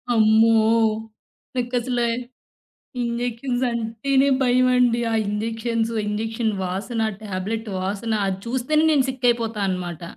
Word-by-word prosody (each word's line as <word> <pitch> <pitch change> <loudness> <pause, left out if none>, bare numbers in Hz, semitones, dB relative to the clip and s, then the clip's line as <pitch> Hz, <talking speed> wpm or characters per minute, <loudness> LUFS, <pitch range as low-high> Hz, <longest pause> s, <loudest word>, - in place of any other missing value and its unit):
అమ్మో! 220 +1 +5 1.0
నాకసల 245 0 -1 1.0
ఇంజెక్షన్స్ 245 +1 -2
అంటేనే 235 +4 +1
భయమండి. 250 -1 +3
ఆ - - +1
ఇంజెక్షన్సు 225 +2 -2
ఇంజెక్షన్ 220 +1 -1
వాసన, 200 +6 -3 0.2
టాబ్లెట్ 210 +3 -4
వాసన 200 +4 -3
అది 190 0 -2
చూస్తేనే 260 +6 +1
నేను 280 -4 +3
సిక్ 260 -1 -5
అయిపోతానన్నమాట. 195 -7 -1
230 Hz, 95 wpm, -22 LUFS, 215-245 Hz, 1.0 s, అమ్మో